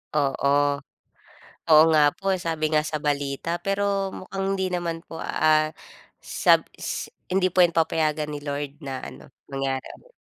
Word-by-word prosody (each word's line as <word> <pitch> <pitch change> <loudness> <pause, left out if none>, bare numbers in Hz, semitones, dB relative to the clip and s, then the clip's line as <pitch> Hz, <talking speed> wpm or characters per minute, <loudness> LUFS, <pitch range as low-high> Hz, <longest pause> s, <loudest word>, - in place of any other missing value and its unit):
Oo. 140 -1 +1 1.2
Oo 155 -1 +8
nga 155 -1 +5
po, 195 - -4
eh. - - -2
Sabi 160 -1 -1
nga 150 0 +4
sa 155 0 -3
balita 145 +1 -1
pero 195 -1 0
mukhang 195 +1 -5
hindi 190 -1 -1
naman 170 -2 -2
po, 165 - -10
ah, 155 -1 +2 0.5
sab - - +3 0.2
s - - -4 0.2
hindi 185 -1 +3
po 180 +1 +5
'yan 170 - +2
papayagan 155 -2 +1
ni 150 - -4
Lord, 145 0 -4
na 135 -1 -4
ano, - - -11 0.2
mangyari 135 -1 -2
ulit. - - -24
155 Hz, 160 wpm, -25 LUFS, 145-185 Hz, 1.2 s, Oo